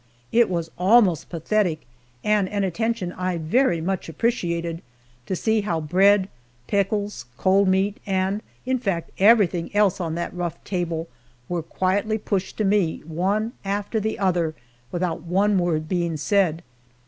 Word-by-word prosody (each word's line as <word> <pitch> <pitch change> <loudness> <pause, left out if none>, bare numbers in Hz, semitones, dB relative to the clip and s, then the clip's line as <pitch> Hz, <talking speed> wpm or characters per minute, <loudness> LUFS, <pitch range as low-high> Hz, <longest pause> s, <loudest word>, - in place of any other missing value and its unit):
It 235 0 +4
was 170 -2 -2
almost 190 -3 +4
pathetic, 170 -1 0 0.4
and 210 -3 +2
an 205 -1 -1
attention 195 0 -1
I 185 -1 -2
very 170 +2 +2
much 185 0 -2
appreciated, 170 -5 -1 0.5
to 190 - -1
see 220 +3 +1
how 175 -5 -1
bread, 190 +5 +4 0.4
pickles, 200 - -1
cold 195 +1 +3
meat, 190 +2 +2
and 190 +2 0 0.2
in 260 0 0
fact 185 -8 -2
everything 195 -5 +4
else 205 -2 +3
on 165 -2 -2
that 170 - -3
rough 175 -2 -3
table, 170 -3 -2 0.4
were 175 -1 -2
quietly 195 +6 0
pushed 195 -3 -3
to 215 - 0
me, 195 -5 +1
one 195 +8 -1
after 205 +3 -1
the 220 +1 -2
other, 175 -5 +1 0.4
without 175 -2 -2
one 190 +4 +2
word 160 -3 0
being 170 -2 -1
said. 175 -1 +1
185 Hz, 145 wpm, -23 LUFS, 170-205 Hz, 0.5 s, It